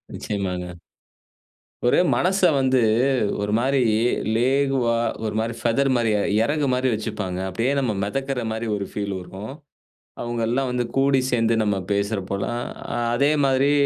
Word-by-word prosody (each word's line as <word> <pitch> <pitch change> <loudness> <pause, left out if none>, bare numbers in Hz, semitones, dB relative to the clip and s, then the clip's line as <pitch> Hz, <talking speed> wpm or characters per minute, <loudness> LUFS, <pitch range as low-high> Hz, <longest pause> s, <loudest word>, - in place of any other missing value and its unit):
நிச்சயமாங்க. 90 -3 -4 1.1
ஒரே 120 - +4 0.2
மனச 190 +2 +1 0.2
வந்து 130 -1 +3 0.6
ஒரு 105 0 -1
மாரி 135 +3 +1 0.6
இலகுவா 130 -1 +2 0.3
ஒரு 105 - -2
மாரி 115 +1 -1
ஃபெதர்மாரியே 120 -3 +1 0.2
இறகுமாரி 130 -2 +1
வச்சுப்பாங்க. 100 -4 -3
அப்பிடியே 115 +9 0
நம்ம 130 -5 0
மெதக்கிறமாரி 115 -1 -2
ஒரு 100 -1 -3
ஃபீல் 100 -1 -3
இருக்கும். 95 +6 -8 0.7
அவுங்கள்லாம் 120 +2 -1
வந்து 125 -1 -1
கூடி 135 0 +3
சேர்ந்து 115 -1 +2
நம்ம 105 -2 +1
பேசுறப்போலாம், 100 +2 -1 0.3
அ - - -2 0.2
அதேமாரி 140 0 +3
120 Hz, 115 wpm, -23 LUFS, 105-135 Hz, 1.1 s, ஒரே